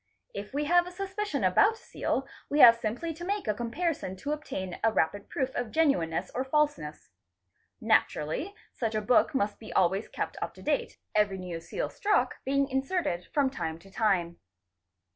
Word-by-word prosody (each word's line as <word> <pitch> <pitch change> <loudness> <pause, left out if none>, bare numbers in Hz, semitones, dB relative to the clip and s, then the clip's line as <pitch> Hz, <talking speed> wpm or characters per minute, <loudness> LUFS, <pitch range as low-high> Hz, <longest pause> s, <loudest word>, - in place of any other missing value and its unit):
If - - -6
we 290 +2 -1
havea 350 +3 +3
suspicion 385 - -3
about 185 - +5
a - - -13
seal, 270 - -3 0.2
we 290 - 0
have 235 -5 +10
— 230 - -18
simply 245 +9 -2
to 335 +3 -9
make 400 +2 -2
a 210 - +2
comparison 240 - -2
to 285 +10 -4
obtain 190 -12 -4
a 225 - +4
rapid 200 +1 0
proof 265 -2 -1
of 245 -2 -2
genuineness 245 - +1
or 255 - -1
falseness. 265 - -1 0.7
Naturally 290 - +1 0.2
such 225 -2 -2
a 215 - +1
book 250 +7 +3
must 205 -5 0
be 220 - -10
always 190 +3 +2
kept - - -4
up - - -4
to - - -13
date, 480 -1 -1 0.2
every 210 -2 +2
new 180 -3 -5
seal - - -3
struck 415 0 +1
being 275 +1 +2
inserted 265 - -1
from 280 -3 +2
time 160 -11 -4
to 195 +4 -17
time. 185 -6 +1
255 Hz, 180 wpm, -29 LUFS, 195-315 Hz, 0.7 s, have